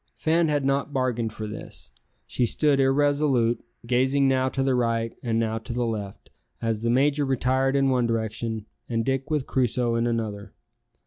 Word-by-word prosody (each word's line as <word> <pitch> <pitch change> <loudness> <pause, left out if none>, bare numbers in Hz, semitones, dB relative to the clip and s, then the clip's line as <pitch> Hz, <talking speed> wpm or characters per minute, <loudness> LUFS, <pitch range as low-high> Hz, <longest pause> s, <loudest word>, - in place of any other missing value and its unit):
Fan 165 +1 +2
had 145 -2 0
not 140 +1 0
bargained 125 -4 -1
for 110 0 -6
this. 105 +1 -9 0.3
She 120 - 0
stood 145 +3 +2
irresolute, 135 -3 +2 0.2
gazing 130 +3 +2
now 130 0 +2
to 135 0 -1
the 135 -1 +2
right 115 -2 0
and 115 -2 -1
now 115 0 0
to 115 +2 -6
the 120 0 0
left, 105 -4 -5 0.3
as 115 -2 -1
the 115 - 0
major 140 +4 +3
retired 135 0 +1
in 135 -1 +3
one 125 -2 +2
direction 110 -1 -2 0.2
and 115 -2 -1
Dick 135 +1 -1
with 150 -4 0
Crusoe 125 -2 0
in 115 +1 +1
another. 110 -3 -3
125 Hz, 175 wpm, -25 LUFS, 115-135 Hz, 0.3 s, major